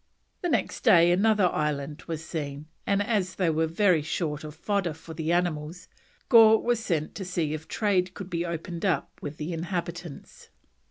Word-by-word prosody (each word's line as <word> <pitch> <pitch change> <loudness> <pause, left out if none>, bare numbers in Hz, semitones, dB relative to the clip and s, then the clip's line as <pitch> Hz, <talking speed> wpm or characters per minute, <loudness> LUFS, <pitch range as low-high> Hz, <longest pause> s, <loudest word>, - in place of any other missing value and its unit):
The 355 - -1
next - - -1
day 175 -7 +6
another 205 +2 +3
island 150 -1 -2
was 160 -1 -4
seen, 145 -3 -5 0.2
and 200 0 +2
as 200 -4 -1
they 180 -4 +1
were 160 +1 +1
very 170 0 +3
short 150 0 -3
of 150 0 -8
fodder 190 -2 -1
for 160 +1 -11
the 160 +1 -2
animals, 175 -1 -1 0.4
Gore 220 -2 +7
was 240 -1 0
sent 165 -9 -2
to 200 - -6
see 170 -4 -2
if 155 +1 -6
trade 185 -4 0
could 190 -2 -8
be 170 0 -1
opened 170 0 -5
up 190 -4 0
with 145 +1 -6
the 155 +3 -4
inhabitants. 170 -2 -6
170 Hz, 175 wpm, -27 LUFS, 155-190 Hz, 0.4 s, Gore